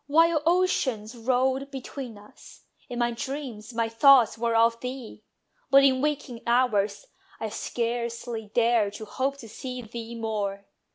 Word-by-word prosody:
While 325 +1 +4
oceans 265 - +1
rolled 260 +3 0
between 265 -3 -7
us, 205 +1 -16 0.3
in 245 - -5
my 240 0 +1
dreams 250 -3 -6
My 230 -1 0
thoughts 240 +1 +6
were 230 0 0
of 230 +1 +4
thee: 250 -1 -7 0.5
but 275 0 +7
in 260 -1 +4
waking 285 -5 -2
hours 220 -5 +2 0.3
I 220 - -3
scarcely 235 -1 -3
dared 230 -3 +2
to 215 - -7
hope 270 +5 -2
to 235 - -10
see 250 +3 -6
thee 230 +1 -7
more. 205 -3 -3
235 Hz, 145 wpm, -26 LUFS, 225-265 Hz, 0.5 s, but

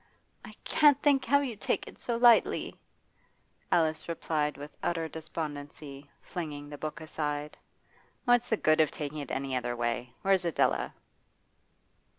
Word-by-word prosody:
'I - - -10
can't 290 -2 +5
think 280 -3 +4
how 280 +4 +4
you 255 -5 -3
take 200 - -1
it - - -12
so 235 -1 -2
lightly,' 235 -1 +4 1.0
Alice 160 -1 +1
replied 155 -2 -1
with 145 +1 -9
utter 165 -2 -1
despondency, 145 -3 -7
flinging 150 -5 -6
the 145 - -7
book 155 +1 -4
aside. 150 -1 -3 0.7
'What's 245 -1 +4
the 220 - +2
good 155 -3 +4
of 155 - +3
taking 150 0 -5
it 140 - -6
any 135 -1 -2
other 120 -1 -1
way? 120 +1 -2
Where's 195 -1 +3
Adela? 170 -3 +1
155 Hz, 145 wpm, -30 LUFS, 145-195 Hz, 1.0 s, can't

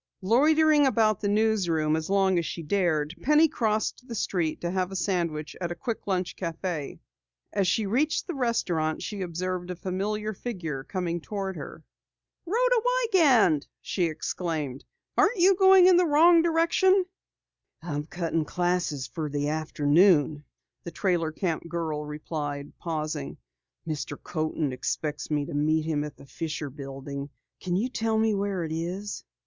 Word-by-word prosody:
Loitering 300 +6 +4
about 215 -5 +2
the 205 - 0
newsroom 195 -8 +2
as 160 +1 -3
long 195 -2 +3
as 170 - -2
she 165 - -5
dared, 160 -3 0
Penny 300 +3 +5
crossed 220 0 -1
the 235 - -6
street 175 -6 -1
to 170 - -2
have 185 0 -1
a - - -6
sandwich 170 -5 -2
at 175 -1 -2
a - - -3
quick 220 +6 -5
lunch 185 -2 -1
cafe. 165 -3 -4 0.5
As 195 -2 +1
she 210 +4 +1
reached 265 +10 +1
the 355 - -4
restaurant 180 - -1
she 205 -2 -5
observed 180 +1 -3
a 180 - -3
familiar 205 +4 -3
figure 175 - -5
coming 175 0 -3
toward 195 0 -4
her. - - -9 0.6
"Rhoda - - +3
Wiegand!" 330 - +3
she 180 - -1
exclaimed. 155 -4 -3 0.4
"Aren't 405 +4 +4
you 370 +2 +6
going 380 -1 +7
in 365 -1 +7
the 360 -1 +4
wrong 330 +3 +6
direction?" 340 +3 +3 0.8
"I'm 150 -3 -4
cutting 165 -2 -1
classes 175 -6 -1
for 155 +3 -4
the 145 0 -1
afternoon," 155 0 +3 0.4
the - - -5
trailer 170 -3 0
camp 170 0 -2
girl 160 -3 -2
replied, 150 -1 -5
pausing. 155 - -4 0.5
"Mr. 145 -6 -4
Coaten 155 -4 -2
expects 150 +3 -3
me 145 -2 0
to - - -7
meet 155 +2 +1
him 155 -2 0
at 150 - -7
the - - -14
Fischer 155 0 -5
Building. 140 0 -7 0.3
Can 180 -1 -2
you 210 +7 +1
tell 225 -3 -1
me 220 0 +2
where 200 -3 -1
it 160 - -5
is?" 180 +6 -4
180 Hz, 155 wpm, -27 LUFS, 155-220 Hz, 0.8 s, going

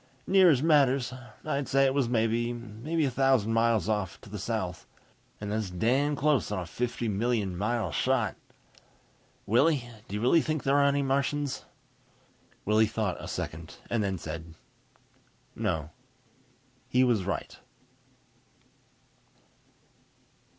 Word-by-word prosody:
"Near 190 -1 +6
as 140 -3 +3
matters. 140 -5 +3 0.3
I'd 140 -1 -1
say 135 0 +3
it 135 - +2
was 135 -4 +1
maybe 120 +5 -1
a 135 - 0
thousand 125 -4 +2
miles 115 -4 +2
off, 95 -7 -1
to 105 - -14
the 105 - -5
south. 95 -4 -3 0.5
And 105 0 -5
that's 110 -2 -1
damn 130 +11 +1
close 145 -5 +1
on 105 - -1
a 90 - -3
fifty 120 +6 -3
million 105 -2 0
mile 105 0 -1
shot. - - +1 1.1
Willie, 130 +3 +3 0.2
do 100 - -5
you - - -1
really 130 +8 +4
think 155 -1 -2
there 135 +1 +3
are 140 - +4
any 140 0 +2
Martians?" 140 +1 -1 1.0
Willie 110 +1 +4
thought 105 -3 -2
a - - -6
second 80 -1 -5 0.2
and 115 -3 +1
then 95 -2 -1
said, 80 0 -7 1.0
"No." 85 -8 -2 1.0
He 125 +1 +4
was 120 -6 +2
right. 95 0 -4
115 Hz, 130 wpm, -28 LUFS, 105-135 Hz, 1.1 s, Near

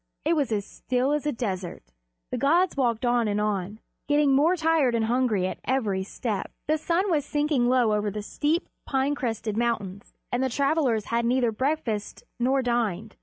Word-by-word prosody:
It 330 +2 +3
was 285 -6 0
as 205 -2 -1
still 255 +5 -1
as 300 0 0
a - - +2
desert. 190 - -4 0.5
The - - -1
gods 335 +7 +3
walked 245 -4 0
on 240 -2 +2
and 205 0 0
on, 210 -1 -1 0.3
getting 290 -1 +3
more 310 +7 +4
tired 320 -7 +2
and 225 -1 +1
hungry 230 -5 +1
at 185 - -4
every 220 -8 0
step. 205 +1 -4 0.2
The 310 +1 +2
sun 350 +5 0
was 300 -3 +2
sinking 295 -5 +1
low 245 -4 +3
over 210 0 0
the 210 +1 -5
steep, 305 - -1 0.2
pine 270 +1 +1
crested 225 -6 -3
mountains, 205 -5 -2 0.2
and 245 - 0
the 265 - +1
travelers 275 -4 +1
had 235 0 +2
neither 240 0 +2
breakfasted 240 -4 -2
nor 260 +2 +2
dined. 225 -4 -1
245 Hz, 180 wpm, -26 LUFS, 215-290 Hz, 0.5 s, more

